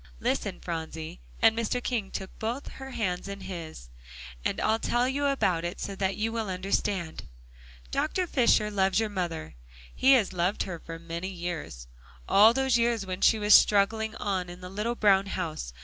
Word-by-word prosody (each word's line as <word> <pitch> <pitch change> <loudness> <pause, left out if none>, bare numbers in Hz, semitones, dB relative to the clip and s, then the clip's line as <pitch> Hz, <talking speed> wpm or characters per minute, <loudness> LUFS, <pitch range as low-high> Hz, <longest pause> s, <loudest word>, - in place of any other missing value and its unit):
"Listen, - - -1
Phronsie," 160 - -6 0.2
and 225 0 +6
Mr. 230 +1 -1
King 225 -6 -2
took 190 -1 -6
both 235 +5 -3
her 265 0 -9
hands 185 -7 -2
in 200 0 -7
his, 165 - -8 0.5
"and - - -1
I'll 220 +1 +2
tell 240 +2 +1
you 285 +2 0
about 185 -12 +1
it 175 +2 -4
so 200 - -4
that 190 0 -1
you 220 +1 -1
will 225 -3 -3
understand. 185 -2 -2 0.7
Dr. 365 +4 0
Fisher 235 -8 +3
loves 195 0 +2
your 220 -1 0
mother; 170 - -4 0.4
he 270 +1 +5
has 225 -8 +3
loved 180 +3 0
her 175 -3 -6
for 165 0 -8
many 170 +2 -5
years 170 - -5 0.4
all 215 +3 +7
those 265 -1 +2
years 230 -3 +1
when 185 0 -5
she 225 - +5
was 210 0 +4
struggling 220 +2 +4
on 190 -4 -2
in 175 0 -9
the 180 0 -8
little 215 +4 -2
brown 200 -3 +4
house. 160 - -4
195 Hz, 180 wpm, -28 LUFS, 175-225 Hz, 0.7 s, all